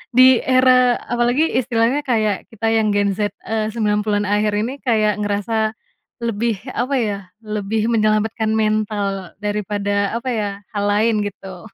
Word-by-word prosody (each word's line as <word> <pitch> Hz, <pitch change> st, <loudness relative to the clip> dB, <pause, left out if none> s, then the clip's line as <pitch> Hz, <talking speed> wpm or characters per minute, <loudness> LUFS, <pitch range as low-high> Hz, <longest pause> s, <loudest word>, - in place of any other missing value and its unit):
di 255 Hz, -1 st, +7 dB
era 255 Hz, -1 st, +4 dB, 0.2 s
apalagi 240 Hz, +5 st, +2 dB, 0.2 s
istilahnya 240 Hz, +2 st, +1 dB
kayak 215 Hz, -5 st, 0 dB
kita 225 Hz, 0 st, -3 dB
yang 220 Hz, -1 st, +2 dB
Gen 200 Hz, -1 st, +2 dB
Z, 205 Hz, -1 st, 0 dB
eee, 220 Hz, -1 st, -1 dB
90-an 210 Hz, -1 st, 0 dB
akhir 210 Hz, +1 st, +1 dB
ini 225 Hz, +5 st, -1 dB
kayak 215 Hz, -4 st, +1 dB
ngerasa 215 Hz, +2 st, -1 dB, 0.5 s
lebih 230 Hz, 0 st, 0 dB, 0.2 s
apa 255 Hz, +4 st, -1 dB
ya, 210 Hz, -3 st, -1 dB, 0.3 s
lebih 215 Hz, +1 st, -2 dB
menyelamatkan 215 Hz, 0 st, +1 dB
mental 210 Hz, -3 st, -1 dB
daripada 205 Hz, 0 st, -1 dB
apa 235 Hz, +2 st, -3 dB
ya, 210 Hz, -3 st, -1 dB, 0.3 s
hal 205 Hz, -, 0 dB
lain 215 Hz, +2 st, +2 dB
gitu. 195 Hz, 0 st, -10 dB
215 Hz, 140 wpm, -20 LUFS, 205-230 Hz, 0.5 s, di